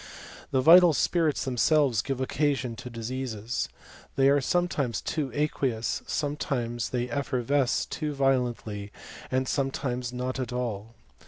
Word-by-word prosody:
The 130 - +2
vital 170 +3 +8
spirits 160 +1 +1
themselves 130 -2 +3
give 135 -2 -3
occasion 135 -2 0
to 125 0 -7
diseases. 115 -1 -4 0.5
They 135 0 +4
are 140 0 +4
sometimes 140 - 0
too 150 -4 -2
aqueous, 125 -5 -1
sometimes 125 -6 -2
they 125 -1 -1
effervesce 135 0 0
too 155 -2 -3
violently, 125 -7 -1 0.4
and 130 0 0
sometimes 130 -3 -2
not 125 +1 -3
at 125 -1 -3
all. 115 -3 -4
130 Hz, 120 wpm, -27 LUFS, 120-145 Hz, 0.5 s, vital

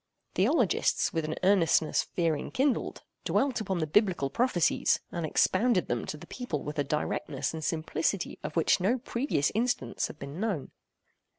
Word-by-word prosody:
Theologists - - +2
with 165 -1 -1
an 155 +1 -3
earnestness 170 -5 +3
fear 165 -3 0
enkindled, 260 - -1 0.2
dwelt 270 -4 +1
upon 190 -4 -2
the 160 - 0
biblical 175 -5 +2
prophecies, 235 - +2
and 170 -2 -2
expounded 185 - +2
them 120 -1 -1
to 150 - -4
the 165 - -11
people 170 - -4
with 150 0 -5
a - - +3
directness 145 0 -2
and 160 -1 -5
simplicity 160 +3 -1
of 150 +1 -6
which 165 - +3
no 205 +8 +2
previous 235 - -1
instance 220 - 0
had - - -11
been 140 +4 -7
known. 200 -10 -2
170 Hz, 160 wpm, -29 LUFS, 150-215 Hz, 0.2 s, earnestness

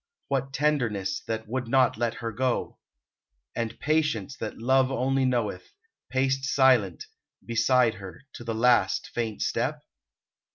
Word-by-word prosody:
What 135 -1 -1
tenderness 125 -10 0
that 110 -1 -3
would 125 +1 -3
not 130 0 +3
let 115 0 -1
her 115 -1 -4
go? 125 +2 -2 0.8
And 115 -1 -3
patience 150 -6 0
that 110 - -5
Love 130 +3 +3
only 135 +1 +1
knoweth, 120 - -2 0.4
paced 135 0 0
Silent, 130 -9 +3 0.4
beside 120 0 +3
her, 95 +1 -10
to - - -9
the 115 -1 -3
last, 115 -5 +3
faint 115 -3 -2
step? - - -1
125 Hz, 130 wpm, -27 LUFS, 110-135 Hz, 0.8 s, not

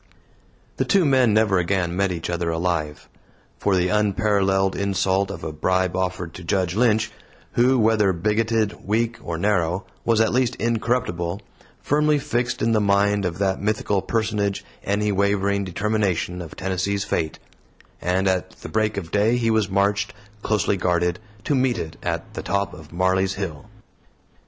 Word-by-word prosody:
The - - +2
two 195 -4 +3
men 130 -5 +4
never 105 -3 +3
again 90 -1 0
met 100 0 +1
each 85 -2 -4
other 85 0 -1
alive. 80 -3 -2 0.5
For 100 - +2
the 90 0 +2
unparalleled 100 -2 +2
insult 95 0 +1
of - - -7
a 80 - -3
bribe 90 +4 0
offered 90 -2 -2
to 90 - -9
Judge 90 0 0
Lynch 110 -1 +2 0.4
who, 125 +2 +3
whether 110 -3 +3
bigoted, 105 +3 0
weak, 115 +3 0
or 85 -1 -4
narrow, 90 -1 0 0.2
was 115 -2 +2
at 115 0 +3
least 125 -1 +1
incorruptible 110 -6 -1 0.4
firmly 150 +1 +3
fixed 120 -3 -1
in 115 - +2
the 110 -1 +3
mind 100 0 +2
of 85 -2 -2
that 95 -1 0
mythical 105 -1 0
personage 105 -3 -1 0.2
any 105 +1 0
wavering 100 0 +1
determination 95 -2 -1
of 80 -3 -9
Tennessee's 95 +2 -1
fate; 80 -6 -2 0.6
and 95 +2 +1
at 95 -1 0
the - - -7
break 110 -1 0
of 85 -4 -5
day 110 +4 +3
he 115 -2 +1
was 110 -3 +1
marched, 100 +2 +1 0.3
closely 105 -2 +1
guarded, 90 +1 0 0.2
to 145 - 0
meet 130 -3 +2
it 80 -5 -5
at - - -3
the - - -4
top 100 0 -1
of 80 -3 -12
Marley's 95 +2 +1
Hill. 85 -7 -5
100 Hz, 160 wpm, -23 LUFS, 90-110 Hz, 0.6 s, men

